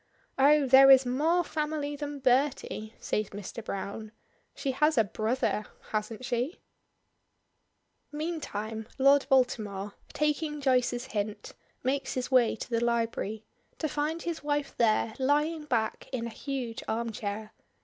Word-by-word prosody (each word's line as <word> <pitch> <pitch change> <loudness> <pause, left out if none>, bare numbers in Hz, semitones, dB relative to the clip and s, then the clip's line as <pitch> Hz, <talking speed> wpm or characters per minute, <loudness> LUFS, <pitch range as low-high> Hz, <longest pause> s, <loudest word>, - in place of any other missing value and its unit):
"Oh, 290 +1 +6
there 270 +1 +8
is 265 -1 +8
more 310 +8 +2
family 300 -2 -2
than 290 0 -5
Bertie," 255 -4 0
says 210 -1 -1
Mr. 205 +3 -7
Browne. 205 +2 -5 0.4
"She 275 - -2
has 300 +4 +2
a 225 - +6
brother, 215 +1 -1 0.2
hasn't 215 +3 -3
she?" 245 +8 -1 1.5
Meantime 225 -9 -4
Lord 275 0 +5
Baltimore, 210 -7 +1 0.2
taking 300 0 -1
Joyce's 250 -2 +1
hint, 210 0 -3 0.3
makes 270 +2 -1
his 255 +1 -3
way 250 -3 +4
to 225 - -7
the 230 0 +1
library, 230 -2 -1 0.3
to 315 - -1
find 305 +3 -2
his 340 -2 -3
wife 290 -1 -1
there 220 -1 +2
lying 300 +4 +1
back 230 -5 -1
in 245 -3 -2
a 235 - -5
huge 250 -1 -4
arm 230 +1 -1
chair. 215 0 -5
255 Hz, 135 wpm, -29 LUFS, 220-290 Hz, 1.5 s, there